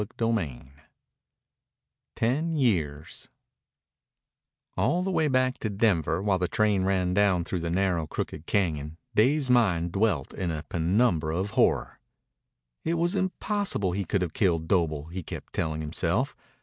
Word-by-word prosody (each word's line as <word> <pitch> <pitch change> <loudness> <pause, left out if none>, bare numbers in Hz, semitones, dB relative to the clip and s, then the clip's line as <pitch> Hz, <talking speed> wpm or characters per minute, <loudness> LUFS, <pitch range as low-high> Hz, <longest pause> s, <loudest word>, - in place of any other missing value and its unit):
CHAPTER 105 +2 -3
XIV 85 - -2 1.5
TEN 150 +8 0
YEARS 80 - -1 1.5
All 180 +1 +1
the 190 - -1
way 160 -4 +2
back 130 -1 +1
to 110 - -2
Denver, 95 -5 +1
while 100 -2 +2
the 90 - +1
train 105 -3 +2
ran 90 -2 +1
down 100 -3 +3
through 90 +1 -3
the 85 0 -3
narrow, 90 -3 0
crooked 80 - -5
cañon, 80 -6 -1 0.2
Dave's 130 +5 +3
mind 90 -9 +3
dwelt 95 -7 0
in 90 - -3
a 80 -1 -3
penumbra 85 -2 +1
of 95 +3 -2
horror. - - +1 0.8
It 165 - 0
was 170 +2 +1
impossible 190 - -1
he 100 +3 -1
could 90 +2 0
have 85 - -4
killed 85 -5 +1
Doble, 80 -6 +1
he 95 +2 -5
kept - - -9
telling 80 -1 -2
himself. 85 - -1
95 Hz, 145 wpm, -27 LUFS, 85-115 Hz, 1.5 s, down